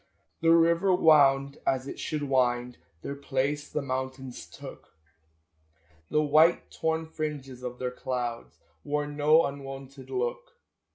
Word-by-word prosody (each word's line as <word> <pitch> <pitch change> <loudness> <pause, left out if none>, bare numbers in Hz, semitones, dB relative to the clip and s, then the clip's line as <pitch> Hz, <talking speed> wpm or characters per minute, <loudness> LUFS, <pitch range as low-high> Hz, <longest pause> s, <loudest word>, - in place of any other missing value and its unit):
The 165 - +3
river 170 +3 +4
wound 140 -4 +4
as 130 0 0
it - - -7
should 150 -2 -3
wind; 125 -3 0 0.2
Their 140 - -4
place 140 +1 -2
the 150 - -2
mountains 130 -1 -5
took; - - -12 1.1
The 150 - +2
white 155 +3 +4
torn 160 0 -1
fringes 150 -5 -5
of 125 -1 -6
their 125 0 -3
clouds 125 -2 -4 0.3
Wore 150 0 -1
no 150 +2 +4
unwonted 135 -1 -8
look. 485 +4 -3
140 Hz, 125 wpm, -28 LUFS, 130-155 Hz, 1.1 s, river